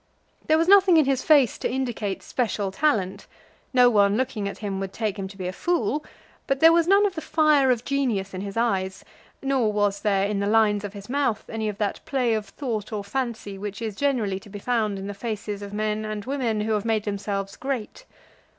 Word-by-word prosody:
There 315 Hz, -, +4 dB
was 330 Hz, +1 st, +2 dB
nothing 385 Hz, -3 st, +7 dB
in 310 Hz, -, +5 dB
his 270 Hz, -1 st, +1 dB
face 285 Hz, -6 st, +4 dB
to -, -, -1 dB
indicate 240 Hz, -6 st, -3 dB
special 210 Hz, -5 st, -1 dB
talent. 205 Hz, -7 st, 0 dB, 0.4 s
No 250 Hz, -2 st, +6 dB
one 205 Hz, -3 st, +4 dB
looking 225 Hz, -5 st, -2 dB
at -, -, -8 dB
him 200 Hz, -3 st, -4 dB
would 195 Hz, 0 st, -5 dB
take 215 Hz, -3 st, -2 dB
him 190 Hz, -, -3 dB
to 195 Hz, 0 st, -13 dB
be 185 Hz, -2 st, -4 dB
a 185 Hz, -, -4 dB
fool; 300 Hz, -, 0 dB, 0.4 s
but 275 Hz, 0 st, 0 dB
there 325 Hz, +2 st, +7 dB
was 335 Hz, 0 st, +3 dB
none 400 Hz, +2 st, +5 dB
of 400 Hz, -, 0 dB
the 320 Hz, -, -5 dB
fire 305 Hz, -5 st, +3 dB
of 245 Hz, -2 st, +1 dB
genius 240 Hz, -9 st, -1 dB
in 185 Hz, -, -4 dB
his 200 Hz, +1 st, -6 dB
eye, 195 Hz, -5 st, +1 dB, 0.5 s
nor 265 Hz, -5 st, +1 dB
was 205 Hz, -1 st, 0 dB
there 200 Hz, -2 st, +2 dB
in 205 Hz, -1 st, -1 dB
the 200 Hz, -, 0 dB
lines 210 Hz, -1 st, +3 dB
of 205 Hz, -1 st, -6 dB
his 200 Hz, -1 st, -10 dB
mouth 260 Hz, -5 st, -1 dB
any 220 Hz, -1 st, -3 dB
of 205 Hz, -, -6 dB
that 210 Hz, -2 st, -2 dB
play 250 Hz, -4 st, 0 dB
of 215 Hz, -2 st, -2 dB
thought 220 Hz, -2 st, -4 dB
or 210 Hz, -2 st, -3 dB
fancy 215 Hz, -3 st, -4 dB
which 205 Hz, 0 st, -5 dB
is 220 Hz, -3 st, -4 dB
generally 225 Hz, -8 st, 0 dB
to 205 Hz, -, -15 dB
be 205 Hz, -, -7 dB
found 215 Hz, -2 st, 0 dB
in 195 Hz, -, -6 dB
the 205 Hz, -, -4 dB
faces 210 Hz, -1 st, -5 dB
of 200 Hz, -1 st, -7 dB
men 215 Hz, +1 st, -1 dB
and 215 Hz, -1 st, -5 dB
women 245 Hz, -5 st, -1 dB
who 220 Hz, +1 st, -1 dB
have 210 Hz, -2 st, +1 dB
made 220 Hz, -2 st, 0 dB
themselves 200 Hz, -1 st, -3 dB
great. 265 Hz, -, -5 dB
215 Hz, 225 wpm, -25 LUFS, 200-265 Hz, 0.5 s, nothing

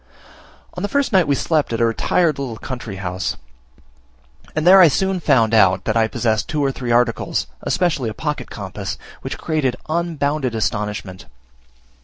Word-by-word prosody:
On 180 Hz, -, -6 dB
the 205 Hz, -, -2 dB
first 280 Hz, -2 st, 0 dB
night 185 Hz, -4 st, +4 dB
we 140 Hz, -, +2 dB
slept 155 Hz, -1 st, 0 dB
at 115 Hz, -, -1 dB
a 115 Hz, -, +4 dB
retired 150 Hz, +7 st, +1 dB
little 125 Hz, -5 st, -4 dB
country 120 Hz, -4 st, -6 dB
house; 95 Hz, -1 st, -3 dB, 1.2 s
and 155 Hz, 0 st, 0 dB
there 190 Hz, +2 st, +8 dB
I 175 Hz, -, +9 dB
soon 190 Hz, +4 st, 0 dB
found 115 Hz, -8 st, +3 dB
out 95 Hz, -4 st, +4 dB
that 110 Hz, -, 0 dB
I 115 Hz, -1 st, +3 dB
possessed 110 Hz, -1 st, -1 dB
two 150 Hz, -2 st, 0 dB
or 135 Hz, -, +1 dB
three 125 Hz, -2 st, -6 dB
articles, 120 Hz, 0 st, +1 dB, 0.2 s
especially 150 Hz, -10 st, 0 dB
a -, -, -5 dB
pocket -, -, -4 dB
compass, -, -, -6 dB, 0.2 s
which -, -, -5 dB
created 145 Hz, -6 st, -1 dB
unbounded 155 Hz, -6 st, -1 dB
astonishment. 105 Hz, -3 st, -3 dB
130 Hz, 165 wpm, -20 LUFS, 110-160 Hz, 1.2 s, I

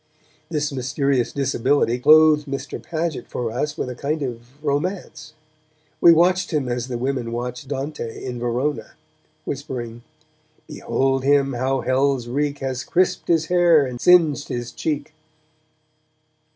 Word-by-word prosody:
This 150 Hz, -2 st, -1 dB
mysterious 130 Hz, 0 st, 0 dB
disability 135 Hz, -2 st, +1 dB
clothed 155 Hz, +1 st, +6 dB
Mr. 135 Hz, 0 st, -5 dB
Paget 160 Hz, -5 st, -3 dB
for 120 Hz, -2 st, -3 dB
us 150 Hz, +5 st, -3 dB
with -, -, -2 dB
a 125 Hz, -, -4 dB
kind 145 Hz, +4 st, -2 dB
of 120 Hz, -3 st, -4 dB, 0.2 s
romance. 155 Hz, 0 st, -3 dB, 0.7 s
We 170 Hz, -, +8 dB
watched 180 Hz, +3 st, +3 dB
him 145 Hz, -5 st, 0 dB
as 120 Hz, 0 st, -2 dB
the 125 Hz, -2 st, -3 dB
women 125 Hz, -2 st, -2 dB
watched 125 Hz, +2 st, -5 dB
Dante 135 Hz, -3 st, -5 dB
in 125 Hz, -2 st, -5 dB
Verona, 125 Hz, +5 st, -2 dB, 0.5 s
whispering: 125 Hz, -4 st, -5 dB, 0.7 s
Behold 135 Hz, 0 st, -1 dB
him 140 Hz, -1 st, +3 dB
how 130 Hz, +2 st, -1 dB
Hell's 130 Hz, -1 st, +1 dB
reek 145 Hz, +3 st, -1 dB
Has 130 Hz, -1 st, -3 dB
crisped 180 Hz, 0 st, 0 dB
his 165 Hz, -2 st, +2 dB
hair 170 Hz, -4 st, +4 dB
and 125 Hz, -2 st, -6 dB
singed 160 Hz, -5 st, +4 dB
his 120 Hz, 0 st, -4 dB
cheek! 150 Hz, -1 st, -3 dB
140 Hz, 135 wpm, -22 LUFS, 125-155 Hz, 0.7 s, We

